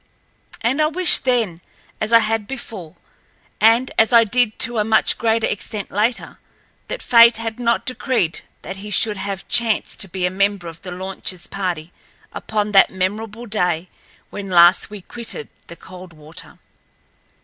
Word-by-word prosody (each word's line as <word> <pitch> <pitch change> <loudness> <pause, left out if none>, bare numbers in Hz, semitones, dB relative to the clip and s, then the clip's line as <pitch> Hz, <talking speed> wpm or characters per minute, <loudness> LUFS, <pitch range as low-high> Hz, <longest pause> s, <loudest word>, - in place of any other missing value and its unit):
And 255 +6 +1
I 305 - +4
wished 345 -1 +2
then, 225 -10 0 0.4
as 215 +1 +1
I 230 - +8
had 220 -1 -1
before, 210 -10 -8 0.6
and 230 +4 +4
as 225 - +4
I 235 -1 +7
did 225 0 0
to 235 -1 0
a - - +2
much 220 0 +2
greater 225 -1 +1
extent 205 0 -4
later, 220 +5 -1 0.5
that - - -6
fate 235 -1 +6
had 225 0 -5
not 235 -1 0
decreed 250 -9 -1 0.2
that 190 - -7
he 205 +2 -8
should 210 0 +1
have 195 0 -5
chanced 235 -3 0
to 195 - -2
be 180 0 -2
a 180 - 0
member 200 -1 0
of 165 0 -10
the 190 - -8
launchl's 185 0 -5
party 175 -4 -4 0.4
upon 210 -1 -2
that 195 -1 +6
memorable 210 +5 -4
day 180 -5 -1 0.4
when 200 -1 -7
last 175 +2 +5
we 210 -1 -9
quitted 225 - -6 0.2
the 170 - -10
Coldwater. 170 -4 -13
210 Hz, 160 wpm, -20 LUFS, 185-230 Hz, 0.6 s, I